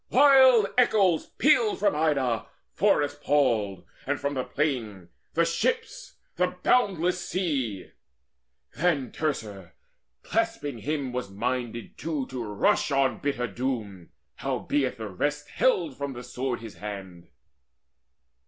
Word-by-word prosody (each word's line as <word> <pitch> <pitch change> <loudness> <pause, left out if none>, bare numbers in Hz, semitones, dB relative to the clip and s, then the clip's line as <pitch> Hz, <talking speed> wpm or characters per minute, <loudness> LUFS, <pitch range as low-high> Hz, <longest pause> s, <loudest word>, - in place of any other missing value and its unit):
Wild 260 -4 +7
echoes 195 -9 +3
pealed 430 -5 +3
from 205 -6 +2
Ida 140 -7 +1 0.3
forest 145 0 +1
palled, 115 -10 +1 0.2
And 145 0 0
from 140 0 -2
the 130 -2 -1
plain, 115 - -2 0.3
the 170 +1 +4
ships, 465 - -2 0.2
the - - 0
boundless 180 -7 +2
sea. 135 - -2 0.8
Then 140 -4 +1
Teucer 105 - -4 0.5
clasping 225 - -1
him 140 0 -3
was 125 -5 -3
minded 120 +2 -4
too 155 -4 -2
To 125 -2 -4
rush 105 +5 +1
on 135 -2 +1
bitter 140 -4 -1
doom: 110 -6 -4 0.3
howbeit 135 -3 -1
the 110 -1 -5
rest 145 +10 -2
Held 170 - +1
from 140 -1 -3
the 120 0 -8
sword 125 -1 -3
his 110 -3 -10
hand. 95 -4 -8
140 Hz, 120 wpm, -27 LUFS, 115-170 Hz, 0.8 s, Wild